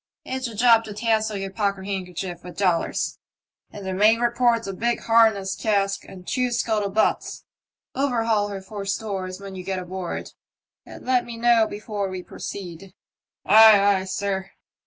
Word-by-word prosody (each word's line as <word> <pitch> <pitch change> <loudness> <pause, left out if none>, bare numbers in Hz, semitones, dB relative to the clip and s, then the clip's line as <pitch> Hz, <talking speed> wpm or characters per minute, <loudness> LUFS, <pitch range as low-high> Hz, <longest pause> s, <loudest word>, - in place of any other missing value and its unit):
" - - -65
It's 260 -1 -3
a 230 - -8
job 230 0 +5
to 210 -2 -8
tassel 220 -1 0
your 195 0 -5
pockethandkerchief 190 -3 -3
with 180 0 -10
dollars, 180 -4 0 0.5
and 200 -2 -10
the 190 - -3
mate 210 +4 +4
reports 240 -1 +2
a 195 - -4
big 235 +5 -1
harness 220 -4 +3
cask 200 -2 0
and 180 -1 -12
two 250 -1 0
scuttle 220 -4 0
butts. 215 +3 0 0.5
Overhaul 230 -6 +1
her 195 -2 -6
for 200 +1 -7
stores 195 -2 -3
when 200 -1 -9
ye 185 - -6
get 190 +1 -3
aboard, 185 -1 -5 0.6
and - - -11
let 250 -1 +2
me 235 -1 -8
know 230 -1 +4
before 205 -1 -4
we 185 -1 -6
proceed." 185 0 -8 0.5
*'Ay, 205 -1 +7
ay, - - -5
sir." 190 0 -3
200 Hz, 160 wpm, -23 LUFS, 190-225 Hz, 0.6 s, Ay